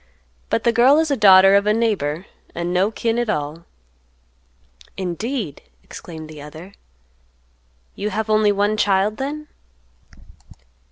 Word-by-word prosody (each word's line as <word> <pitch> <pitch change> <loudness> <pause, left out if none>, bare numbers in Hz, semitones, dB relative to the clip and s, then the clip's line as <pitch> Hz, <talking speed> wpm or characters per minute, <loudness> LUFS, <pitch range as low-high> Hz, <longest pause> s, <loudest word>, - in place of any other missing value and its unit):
But 230 - 0
the 235 - +3
girl 250 +5 +5
is 320 -1 +1
a - - +2
daughter 195 -4 +7
of 200 +1 +3
a 210 - +3
neighbor, 190 -8 -1 0.3
and 170 +1 -3
no 185 +3 +2
kin 230 +1 -2
at 240 -2 -2
all." 155 -2 -3 1.3
"Indeed!" 190 - -4 0.2
exclaimed 160 -2 -10
the 155 -1 -11
other, 160 +6 -11 1.2
"you 205 +1 -4
have 215 +2 -3
only 215 -1 +3
one 205 +1 0
child 205 +1 +1
then?" 300 +3 -5
205 Hz, 130 wpm, -20 LUFS, 175-225 Hz, 1.3 s, daughter